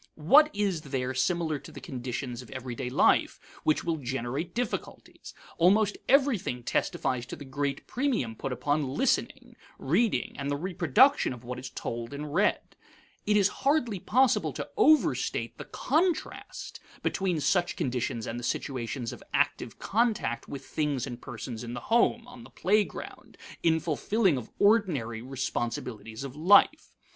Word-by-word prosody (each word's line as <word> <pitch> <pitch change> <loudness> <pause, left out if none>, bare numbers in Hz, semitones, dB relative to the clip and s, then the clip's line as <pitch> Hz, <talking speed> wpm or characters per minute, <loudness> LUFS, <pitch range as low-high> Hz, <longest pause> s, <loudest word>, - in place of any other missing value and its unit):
What 280 - +6
is 200 -5 0
there 130 -3 -3
similar 155 +3 0
to - - -12
the - - -9
conditions 125 -1 -5
of 125 - -14
everyday 125 -1 -5
life 125 - +3 0.2
which 155 - +2
will 165 -1 -1
generate 135 +5 -4
difficulties? 245 -1 -5 0.2
Almost 205 +4 +4
everything 250 - +2
testifies 120 +1 -1
to - - -6
the 145 - -10
great 140 +1 -3
premium 235 - -1
put 135 - -4
upon 145 +1 -1
listening, - - 0 0.2
reading, 170 - +1
and 140 0 -2
the 145 - 0
reproduction 180 - +3
of 125 -1 -11
what 125 +1 -5
is 125 0 -7
told 120 +3 -5
and 145 0 -6
read. 205 +4 +1 0.5
It 210 0 +4
is 200 -2 +5
hardly 265 -8 +1
possible 255 +7 +2
to - - -5
overstate 310 -7 +2
the - - -6
contrast 345 +2 -2 0.2
between 185 -4 0
such 175 +5 +1
conditions 120 -3 -2
and 115 +1 -4
the - - -8
situations 120 -1 -3
of - - -11
active - - 0
contact 210 - 0
with 140 - -7
things 145 -5 -1
and 120 -3 -7
persons 120 -1 -7
in 120 0 -6
the - - -4
home, 235 - +2
on 245 -1 -12
the - - -13
playground, 210 +2 -1 0.2
in 160 -1 +3
fulfilling 175 +4 +1
of 125 -4 -6
ordinary 170 - +2
responsibilities 120 -3 -4
of 135 -1 -7
life. 200 - +4
145 Hz, 150 wpm, -28 LUFS, 125-205 Hz, 0.5 s, What